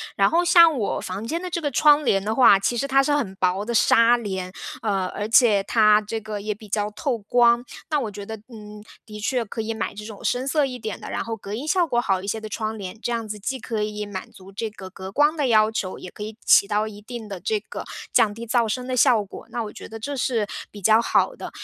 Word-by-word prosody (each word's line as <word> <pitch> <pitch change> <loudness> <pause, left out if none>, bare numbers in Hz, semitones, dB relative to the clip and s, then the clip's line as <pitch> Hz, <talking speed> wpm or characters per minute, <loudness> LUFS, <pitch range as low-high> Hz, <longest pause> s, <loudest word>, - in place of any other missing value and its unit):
然 195 0 +4
后 345 +2 +2
像 335 -3 +6
我 215 - -1
房 190 +4 -5
间 330 +8 -3
的 365 - -5
这 340 - -2
个 295 -3 -2
窗 295 +2 +5
帘 195 -5 +2
的 215 +2 -1
话， 215 -6 +7
其 240 +5 -1
实 275 - 0
它 275 0 +4
是 290 +2 +1
很 235 -10 -2
薄 185 +2 0
的 235 - -3
纱 230 +2 +5
帘， 190 -5 -4 0.3
呃， 195 -4 0
而 205 +3 -4
且 220 -3 +5
它 215 0 +4
这 215 +1 -4
个 215 -1 -5
也 210 +1 -3
比 215 +1 -14
较 210 +1 -1
透 255 +2 -2
光， 235 +3 +3 0.2
那 300 -2 +1
我 230 -6 -3
觉 205 0 -8
得， 220 - -5 0.2
嗯， 210 -1 -11 0.2
的 210 -1 -9
确 245 +3 0
可 225 +1 -5
以 225 +1 -3
买 220 - -4
这 210 +1 -8
种 215 -2 -10
深 250 +2 -1
色 295 +1 +2
一 250 -1 -6
点 220 -3 -6
的， - - -7
然 - - -2
后 230 -1 -4
隔 205 -1 -7
音 265 +7 -5
效 345 +2 +2
果 240 - +1
好 195 -5 0
一 195 - -8
些 220 +2 -2
的 215 - -7
窗 215 +1 -4
帘。 190 -2 -7
这 240 - -2
样 230 -2 -2
子 210 0 -6
既 260 +6 -3
可 220 -2 -3
以 210 0 -3
满 195 -2 -7
足 190 0 -14
这 220 +3 -4
个 200 -3 -10
隔 190 +1 -8
光 295 +8 +3
的 290 -4 0
要 215 -2 +4
求， 190 -4 -3
也 180 - -9
可 - - -13
以 215 +1 -6
起 200 - +6
到 210 +1 0
一 210 -1 -10
定 230 0 -8
的 195 -3 -6
这 210 +4 -1
个 - - -7 0.3
降 215 - +4
低 230 +2 -8
噪 240 -3 +3
声 250 +3 -3
的 255 - -2
效 240 -4 +4
果， 195 - -11
那 235 - -3
我 210 - -7
觉 - - -10
得 225 - -8
这 285 +6 -4
是 245 -4 0 0.2
比 205 - -11
较 220 +4 +5
好 - - +2
的。 - - -7
220 Hz, 290 characters per minute, -23 LUFS, 205-245 Hz, 0.3 s, 话